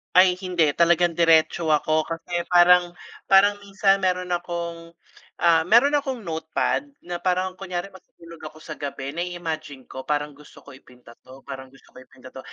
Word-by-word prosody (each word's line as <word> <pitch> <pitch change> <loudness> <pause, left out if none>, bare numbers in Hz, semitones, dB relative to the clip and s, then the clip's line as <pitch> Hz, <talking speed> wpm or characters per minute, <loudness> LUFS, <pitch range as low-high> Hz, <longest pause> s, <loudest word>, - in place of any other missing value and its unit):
Ay, 185 0 +5
hindi 175 -5 +1
talagang 170 +2 +3
diretso 165 0 +2
ako 155 +1 +1
kasi 170 +1 -4
parang, 175 0 +4 0.3
parang 205 +1 +5
minsan 195 0 +1
mayro'n 180 -1 -1
akong, 170 -1 -5 0.5
ah, 165 -1 +4
mayro'n 240 +7 +5
akong 260 -6 -5
notepad. 160 - -2 0.2
Na 175 0 -5
parang 185 +1 0
kunyari 185 0 -5
matutulog 170 -3 -16
ako 155 +1 -15
sa 155 - -9
gabi 140 -1 -5
na-i-imagine 160 -5 -5
ko 130 +1 -10
"Parang 150 0 -1
gusto 145 +1 -17
ko 140 - -14
ipinta 125 -2 -17
to, 130 +1 -16
parang 130 -1 -9
gusto 135 +1 -22
ko - - -14
ipinta 130 0 -16
to." - - -11
170 Hz, 165 wpm, -23 LUFS, 150-180 Hz, 0.5 s, Ay